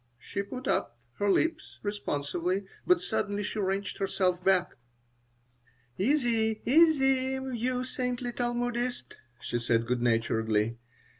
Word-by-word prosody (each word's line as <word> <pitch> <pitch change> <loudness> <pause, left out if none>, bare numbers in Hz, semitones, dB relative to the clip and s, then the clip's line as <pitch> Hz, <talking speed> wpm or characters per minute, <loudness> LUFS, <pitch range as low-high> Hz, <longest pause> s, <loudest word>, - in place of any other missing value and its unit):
She 200 - -4
put 255 +6 -7
up 120 - 0 0.2
her 205 - +2
lips 320 - 0
responsively, 185 -1 -2 0.2
but 360 -1 +5
suddenly 205 0 -1
she 215 - -3
wrenched 195 0 -1
herself 185 -2 0
back 185 -2 +3 1.2
"Easy, 225 - +1
easy, 270 -3 +4 0.2
you 250 +2 -1
saintly 250 -1 -2
Talmudist," 240 - -2 0.3
she 120 - -2
said, 115 -1 +1
good 125 0 -1
naturedly. 115 -1 +1
205 Hz, 115 wpm, -29 LUFS, 170-250 Hz, 1.2 s, but